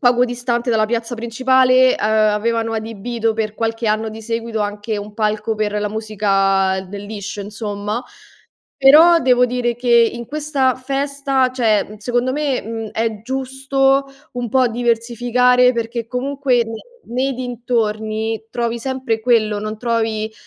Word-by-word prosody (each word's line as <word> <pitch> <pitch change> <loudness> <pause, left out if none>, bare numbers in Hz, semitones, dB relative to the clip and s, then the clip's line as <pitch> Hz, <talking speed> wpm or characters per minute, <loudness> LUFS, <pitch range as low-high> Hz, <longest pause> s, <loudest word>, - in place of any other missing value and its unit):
poco 245 -1 +4
distante 245 0 -2
dalla 215 -1 +2
piazza 230 +1 -2
principale, 255 +2 +3
ehm, - - -16
avevano 220 +1 +1
adibito 225 +1 -2
per 215 -1 -2
qualche 225 0 -2
anno 215 +1 0
di 220 +1 -8
seguito 230 0 -3
anche 205 +1 -3
un 205 +1 -7
palco 215 +1 -1
per 215 -1 -1
la 210 - -1
musica 195 -3 +1
del 200 +1 -7
liscio, 205 -1 -6
insomma, 210 +2 -4 0.7
però 315 +6 +7
devo 250 -1 +4
dire 240 -1 -1
che 245 +1 -5 0.2
in 235 0 -7
questa 285 -3 0
festa 275 0 -1
cioè 215 -4 +1
secondo 245 +3 -1
me, 290 -3 -1
mhmm, 225 0 -5
è 220 -2 -2
giusto 270 +2 0 0.3
un 245 -1 -4
po' 260 +1 +3
diversificare, 245 +2 +2
perché 230 0 -3
comunque 265 +1 -1
ne 225 - -7 0.3
nei 260 +3 -1
dintorni 225 -3 -2
trovi 235 -1 -2
sempre 260 -2 -2
quello, 215 -3 +2
non 215 +1 -4
trovi, 220 -1 -1
230 Hz, 140 wpm, -19 LUFS, 215-250 Hz, 0.7 s, però